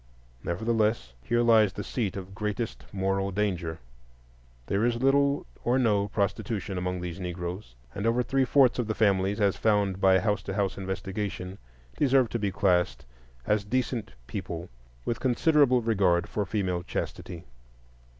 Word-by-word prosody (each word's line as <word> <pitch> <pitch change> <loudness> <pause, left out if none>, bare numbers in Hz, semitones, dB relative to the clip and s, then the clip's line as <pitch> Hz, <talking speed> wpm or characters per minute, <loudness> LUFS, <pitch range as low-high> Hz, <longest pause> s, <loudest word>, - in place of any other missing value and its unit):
Nevertheless, 110 - 0
here 120 - +1
lies 110 -4 +5
the 105 - -5
seat 100 -3 -2
of 95 0 -8
greatest 105 +3 -4
moral 95 0 0
danger. 90 -5 -1 0.9
There 100 - 0
is 120 0 +2
little 140 +3 +2 0.2
or 125 +2 +2
no 105 -5 +2
prostitution 100 0 -2
among 90 0 -2
these 90 0 -5
Negroes, 90 - -5 0.2
and 100 +3 -2
over 120 +2 +2
three 135 +2 +1
fourths 130 -1 +4
of 120 - 0
the 110 - -1
families, 100 -1 +2
as 100 -2 +2
found 100 -3 +1
by 95 -1 +6
house 105 +2 0
to 95 - -5
house 100 -2 0
investigation, 95 0 -4 0.4
deserve 135 -4 +3
to 115 - -2
be 100 -2 0
classed 90 -7 +1 0.4
as 105 -1 +1
decent 120 - -2
people 85 0 -5 0.4
with 115 - -1
considerable 130 -1 +3
regard 95 -6 +2
for 105 -2 -2
female 95 -3 -1
chastity. 90 -1 -5
100 Hz, 150 wpm, -28 LUFS, 95-115 Hz, 0.9 s, by